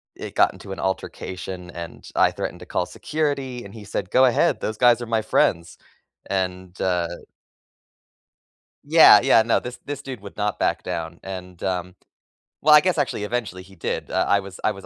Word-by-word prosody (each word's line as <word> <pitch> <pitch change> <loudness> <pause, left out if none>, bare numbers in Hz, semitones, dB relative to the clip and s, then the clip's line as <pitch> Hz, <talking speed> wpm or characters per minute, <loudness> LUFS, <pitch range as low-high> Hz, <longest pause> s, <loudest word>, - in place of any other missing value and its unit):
it - - -8
got - - +4
into 95 - -11
an 95 - -6
altercation, 95 -1 -5
and 85 -1 -9
I - - +5
threatened - - -5
to - - -10
call - - -1
security, 140 -5 -3
and 100 - -11
he 110 -2 -10
said, 95 -2 -4
"Go 130 +1 +6
ahead, 125 - +2
those 110 0 -3
guys 120 -1 +5
are - - -3
my 115 -1 +1
friends." 85 -1 +1 0.5
And, 95 -1 -3
uh 90 -2 +1 1.8
Yeah, - - +8
yeah, 115 - +5
no, 115 - +2
this 125 0 -8
this 145 0 -5
dude 130 -5 -7
would 100 -1 -11
not 105 -1 -1
back - - 0
down, 85 0 -5
and, 90 -2 -8
um 90 -1 -2 0.7
well, 150 0 +8
I 150 - +10
guess, 180 -4 +1
actually, 130 -7 -1
eventually, 105 -5 -3
he 95 +1 -17
did, 85 - -4
uh, - - +1
I 100 - +4
was 95 -1 -10
I - - +3
was 95 -2 -10
100 Hz, 190 wpm, -23 LUFS, 90-120 Hz, 1.8 s, I